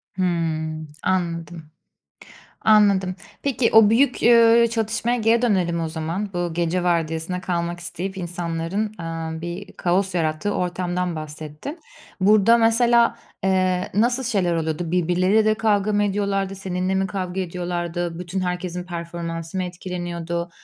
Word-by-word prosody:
Hımm. 160 -3 -1 0.2
Anladım, 170 -3 -2 0.9
anladım. 200 -4 +4 0.3
Peki, 265 -4 +1
o 220 -1 +7
büyük, 250 +3 +3
eee, 235 0 +6
çatışmaya 225 +1 0
geri 230 +1 +2
dönelim 180 -7 +1
o 165 - -2
zaman, 165 +6 -4
bu 175 -2 -2
gece 170 +1 0
vardiyasına 170 0 -1
kalmak 175 -1 -2
isteyip 180 +3 -5
insanların, 175 +1 -3 0.2
eee, 165 -1 -5
bir 175 +4 -6
kaos 185 +2 0
yarattığı 160 +3 -1
ortamdan 180 -1 -2
bahsettin. 155 - -7 0.4
Burada 210 +3 +5
mesela, 235 +1 +4 0.3
eee, 185 -1 +1
nasıl 240 +5 +2
şeyler 195 -7 +1
oluyordu? 160 0 -2
Birbirleriyle 180 +4 +2
de 215 0 +3
kavga 215 -2 +1
mı 205 0 +2
ediyorlardı, 195 -1 -1
seninle 185 -1 -2
mi 190 0 +1
kavga 190 -2 -3
ediyorlardı, 175 -1 -3
bütün 180 +2 -4
herkesin 180 -1 -3
performansı 170 -1 -5
mı 185 - 0
etkileniyordu? 175 -1 -4
180 Hz, 130 wpm, -22 LUFS, 170-205 Hz, 0.9 s, o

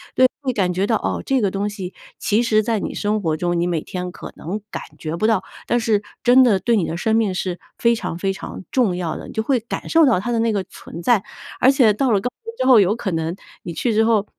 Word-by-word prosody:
对 255 - +6 0.2
会 255 -2 0
感 185 -4 +1
觉 195 +3 0
到， 225 - +2
哦， - - -2
这 265 -3 +1
个 195 -2 +1
东 200 +1 -1
西 190 -3 -6 0.3
其 215 +3 +2
实 215 -2 +2
在 225 -2 0
你 - - -4
生 210 0 -1
活 160 -3 0
中， 175 +1 -1
你 175 - +1
每 165 -3 -1
天 180 -1 -5
可 - - -9
能 195 +6 -5
感 - - -4 0.2
觉 160 +1 -4
不 215 - +1
到， 205 -4 +2 0.2
但 240 - +1
是 220 -3 +1 0.2
真 250 +2 +6
的 225 -6 +5
对 230 +1 +2
你 180 - +1
的 165 - -3
生 220 +5 +1
命 205 -5 +1
是 180 -1 -3 0.2
非 235 0 +3
常 170 - -4
非 195 +1 0
常 190 - -7
重 230 -9 +2
要 175 -3 -3
的。 - - -9
你 - - -10
就 220 - -1
会 255 0 +2
感 225 - -6
受 325 -2 +5
到 185 -8 +3
它 240 - -3
的 230 - +1
那 225 -1 +1
个 195 -2 0
存 180 -2 -10
在， 230 0 +3 0.4
而 260 - +6
且 255 -6 +5
到 245 +4 +1
了 200 -2 +3
高 250 - -1 0.2
原 455 0 -7
之 - - +1
后， 255 -4 +7
有 200 +3 +3
可 195 -5 -3
能 165 +1 -2 0.3
你 170 - -5
去 230 +6 0
之 220 +1 +3
后 220 -3 +3
210 Hz, 290 characters per minute, -21 LUFS, 180-235 Hz, 0.4 s, 后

